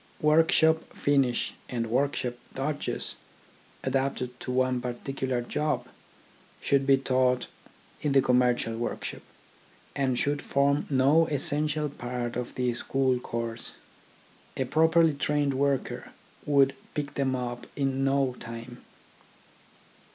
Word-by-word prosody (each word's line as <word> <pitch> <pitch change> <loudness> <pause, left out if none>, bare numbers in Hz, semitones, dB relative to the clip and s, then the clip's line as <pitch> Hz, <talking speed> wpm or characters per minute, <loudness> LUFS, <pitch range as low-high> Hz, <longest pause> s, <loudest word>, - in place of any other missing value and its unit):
Workshop 160 +1 +4 0.2
finish 135 -4 +1 0.2
and 120 -2 -1
workshop 125 +1 0 0.2
dodges, 145 +2 -2 0.7
adapted 130 -2 -1
to 125 - -5
one 130 -1 +1
particular 125 +1 -3
job, 150 +5 -1 0.7
should 140 -1 +1
be 135 -1 +6
taught 130 -1 +1 0.6
in 145 -2 0
the 135 - +6
commercial 125 -2 +2
workshop, 120 - -4 0.7
and 130 -3 +1
should 145 +2 0
form 140 +1 +1
no 140 +4 +4
essen 145 +1 +2
tial 150 -1 -2
part 120 0 -4
of 125 0 -4
the 125 -1 0
school 130 +1 +1
course. 115 -1 -5 0.8
A 130 - 0
properly 160 +3 +4
trained 145 0 0
worker 140 0 -1 0.4
would 140 -2 +4 0.2
pick 145 -1 -3
them 135 -2 0
up 120 -1 -4
in 135 -1 0
no 135 -2 +1
time. 115 +1 -8
135 Hz, 115 wpm, -28 LUFS, 125-145 Hz, 0.8 s, be